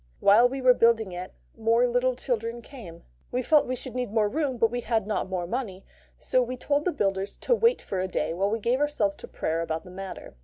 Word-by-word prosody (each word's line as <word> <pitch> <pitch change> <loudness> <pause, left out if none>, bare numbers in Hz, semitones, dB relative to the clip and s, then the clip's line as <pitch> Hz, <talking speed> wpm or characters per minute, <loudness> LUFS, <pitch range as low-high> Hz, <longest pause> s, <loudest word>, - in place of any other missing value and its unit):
While 225 +5 +6
we 265 0 -5
were 255 -1 +7
building 230 -4 +3
it, 180 +1 -6 0.2
more 230 +2 +3
little 245 +1 +1
children 235 -2 -3
came. 210 - -11 0.3
We 250 +1 -1
felt 300 +3 +4
we 255 - -1
should 255 0 -8
need 250 -4 -3
more 215 -1 +2
room, 275 +1 -1
but 225 -1 +2
had 225 -4 +1
not 210 -3 -2
more 180 -2 -2
money; 195 -2 -4 0.3
so 255 - +2
we 250 +1 -3
told 285 +3 0
the 365 - +2
builders 195 - -2
to - - +1
wait 465 0 +3
for 190 - -3
a 185 - -1
day 180 - -2
while 195 +4 0
we 220 - 0
gave 235 +4 0
ourselves 285 -9 0
to - - -10
prayer 165 +1 -2
about 160 -1 -3
the 180 - -12
matter. 190 +1 -8
230 Hz, 230 wpm, -26 LUFS, 195-255 Hz, 0.3 s, were